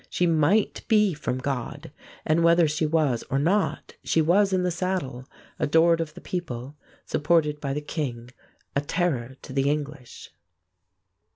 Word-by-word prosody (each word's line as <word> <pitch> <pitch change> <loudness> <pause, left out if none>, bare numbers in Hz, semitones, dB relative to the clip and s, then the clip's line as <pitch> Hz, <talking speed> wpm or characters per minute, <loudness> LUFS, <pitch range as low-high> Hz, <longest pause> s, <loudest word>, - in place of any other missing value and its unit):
She 180 - +1
might 170 +5 +2
be 210 -4 +4
from 130 -4 -3
God, 130 -2 -4 0.3
and 160 +2 +2
whether 170 0 +5
she 155 +1 0
was 150 -7 +1
or 135 - 0
not 185 +8 0
she - - +1
was 190 +6 +3
in 185 -1 +1
the 180 - +1
saddle, 165 -8 -3 0.3
adored 165 +2 +4
of 155 -1 -5
the - - -10
people, 140 -6 -5 0.3
supported 150 -1 +1
by 140 -2 -2
the 150 - -3
king, 125 -6 -5 0.4
a 140 - +2
terror 145 -6 -2
to - - -9
the 135 +1 +1
English. 145 - -5
155 Hz, 155 wpm, -25 LUFS, 140-170 Hz, 0.4 s, whether